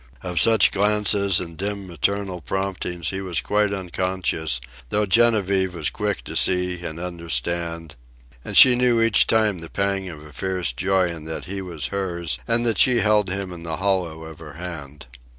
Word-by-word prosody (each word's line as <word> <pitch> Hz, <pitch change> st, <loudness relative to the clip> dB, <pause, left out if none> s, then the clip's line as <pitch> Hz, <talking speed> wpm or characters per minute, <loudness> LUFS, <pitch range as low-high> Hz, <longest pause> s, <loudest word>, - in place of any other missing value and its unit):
Of 90 Hz, -2 st, 0 dB
such 110 Hz, -4 st, +5 dB
glances 100 Hz, -2 st, +2 dB
and 85 Hz, -2 st, -7 dB
dim 100 Hz, +2 st, -4 dB
maternal 95 Hz, +2 st, -2 dB
promptings 95 Hz, -2 st, -3 dB
he 95 Hz, 0 st, -4 dB
was 95 Hz, -3 st, -2 dB
quite 105 Hz, -1 st, 0 dB
unconscious, 90 Hz, -6 st, -2 dB, 0.3 s
though 105 Hz, +6 st, +1 dB
Genevieve 100 Hz, -4 st, +2 dB
was 80 Hz, -3 st, -2 dB
quick 105 Hz, -3 st, -3 dB
to -, -, -8 dB
see 90 Hz, -1 st, +2 dB
and 85 Hz, -1 st, -6 dB
understand; 85 Hz, -1 st, -3 dB, 0.5 s
and -, -, -3 dB
she 130 Hz, -, +10 dB
knew 125 Hz, -1 st, +2 dB
each 115 Hz, -2 st, +4 dB
time 110 Hz, -4 st, +2 dB
the 80 Hz, 0 st, -8 dB
pang 100 Hz, -1 st, -1 dB
of 75 Hz, -3 st, -10 dB
a 75 Hz, -, -14 dB
fierce 90 Hz, -4 st, -2 dB
joy 95 Hz, +6 st, +1 dB
in 80 Hz, -2 st, -8 dB
that 80 Hz, 0 st, -5 dB
he 95 Hz, +1 st, -4 dB
was 80 Hz, -9 st, -5 dB
hers 85 Hz, -4 st, -3 dB
and 120 Hz, 0 st, +2 dB
that 115 Hz, -4 st, +2 dB
she 125 Hz, -2 st, +5 dB
held 105 Hz, -2 st, +2 dB
him 95 Hz, -1 st, -3 dB
in 85 Hz, -, -10 dB
the 80 Hz, -1 st, -4 dB
hollow 90 Hz, -5 st, -1 dB
of 80 Hz, -1 st, -11 dB
her 75 Hz, -3 st, -11 dB
hand. 75 Hz, -4 st, -8 dB
95 Hz, 180 wpm, -22 LUFS, 85-100 Hz, 0.5 s, she